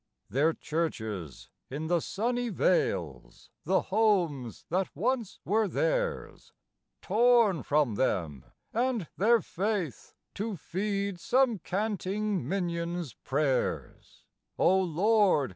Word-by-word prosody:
Their 150 +5 +3
churches 110 - -4 0.2
in 145 +4 -4
the 175 +1 +2
sunny 240 +8 -1
vales; 75 - -1
the 190 +4 +3
homes 180 - 0
that 185 +3 0
once 235 - -1
were 215 +2 +2
theirs, - - -2 0.5
Torn 225 - +4
from 145 -5 +1
them 85 - -1 0.3
and 235 -6 0
their 230 +3 +4
Faith 190 - -3 0.2
to 210 +1 -3
feed 200 +3 -2
some 250 0 +2
canting 200 - -2
minion's 170 - -2
prayers: 135 +1 -2 0.3
Oh 190 +1 +4
Lord! 185 -3 +3
185 Hz, 100 wpm, -29 LUFS, 150-215 Hz, 0.5 s, Torn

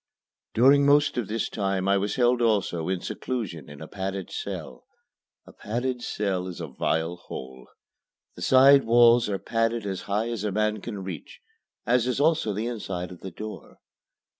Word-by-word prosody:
During 135 +5 +6
most 145 0 +4
of 120 -5 -2
this 115 +2 -2
time 95 -2 -1
I 100 - +4
was 100 +1 -2
held 125 -1 +3
also 100 -8 +1
in 95 -2 -1
seclusion 90 - -5
in 75 0 -11
a 80 - -7
padded 95 0 -5
cell. - - -6 0.6
A - - -15
padded 125 +3 -3
cell 95 -5 -2
is 90 -1 -7
a 85 - -4
vile 80 +4 -1
hole. 65 -5 -9 0.7
The - - -11
side 135 +1 +6
walls 120 0 +5
are 100 - -1
padded 115 +1 -1
as 95 -2 -3
high 105 +4 0
as 115 -4 -4
a 105 - -1
man 105 +1 0
can 105 -4 -6
reach, 90 -5 -8 0.5
as 125 0 +2
is 125 +1 -1
also 155 -6 +2
the 105 +3 -3
inside 95 -7 -4
of 90 - -11
the 95 - -7
door. 110 +4 -9
105 Hz, 175 wpm, -26 LUFS, 95-120 Hz, 0.7 s, During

